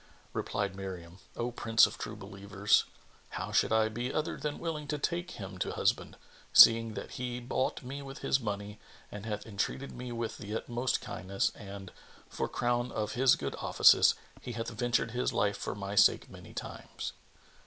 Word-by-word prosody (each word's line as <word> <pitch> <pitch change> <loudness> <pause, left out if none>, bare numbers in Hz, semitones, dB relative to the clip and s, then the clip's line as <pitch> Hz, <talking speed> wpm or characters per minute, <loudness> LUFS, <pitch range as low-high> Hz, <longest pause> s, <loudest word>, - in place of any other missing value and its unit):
Replied 100 -2 -2
Miriam, 90 -2 -7 0.2
"O 120 +1 -2
Prince 115 -2 +5
of - - -6
True 105 - -5
Believers, 100 0 +1 0.5
how - - -4
should - - +3
I 110 0 +4
be 120 +4 -3
other 155 - -1
than 150 -1 -3
willing 155 -3 -4
to 150 - -1
take 175 +4 -2
him 95 -3 -7
to - - -1
husband, - - 0 0.3
seeing 115 -1 +8
that - - -6
he 125 -1 -4
bought 130 +2 -1
me 135 +3 -6
with 135 -1 -9
his 135 - +3
money 105 -2 -4 0.3
and 105 +1 -7
hath 105 -1 -3
entreated 110 +6 -3
me 125 0 -7
with 115 -1 -4
the 105 +2 -5
utmost 120 +2 -1
kindness 100 +5 -1
and, 100 -3 -9 0.4
for - - -3
crown 120 0 0
of 105 -1 -2
his 125 +3 +5
good - - -4
offices, - - +6 0.3
he 125 - -6
hath 115 0 -3
ventured 115 0 0
his 125 +2 -1
life 100 0 +1
for - - -4
my 100 0 -5
sake 105 - +5
many - - -12
times?" - - -6
115 Hz, 175 wpm, -31 LUFS, 100-125 Hz, 0.5 s, seeing